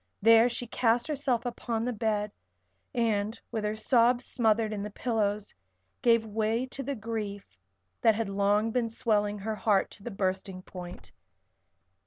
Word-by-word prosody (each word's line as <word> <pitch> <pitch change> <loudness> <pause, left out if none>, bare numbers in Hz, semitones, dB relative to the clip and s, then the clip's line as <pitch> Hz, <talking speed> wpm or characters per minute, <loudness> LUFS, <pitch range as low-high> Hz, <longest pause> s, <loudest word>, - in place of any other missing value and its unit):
There 225 +2 +6
she 245 0 -3
cast 235 0 +1
herself 270 -5 -1
upon 235 -1 -2
the 250 - -1
bed 210 -1 -1 0.6
and, 220 -2 0
with 220 - -2
her 210 +1 -1
sobs 240 +2 +3
smothered 220 -2 +1
in 205 - -3
the 210 - -4
pillows, 210 -2 -1 0.5
gave 230 -2 +4
way 220 +3 0
to 260 +1 -6
the 275 +1 -3
grief 210 - -6 0.4
that 225 -2 +5
had 225 -1 -1
long 205 +3 +1
been 235 -1 0
swelling 210 -2 0
her 215 +2 -3
heart 210 -2 +2
to - - -11
the 240 - -4
bursting 190 -2 -3
point. 180 -1 -9
220 Hz, 155 wpm, -29 LUFS, 205-235 Hz, 0.6 s, There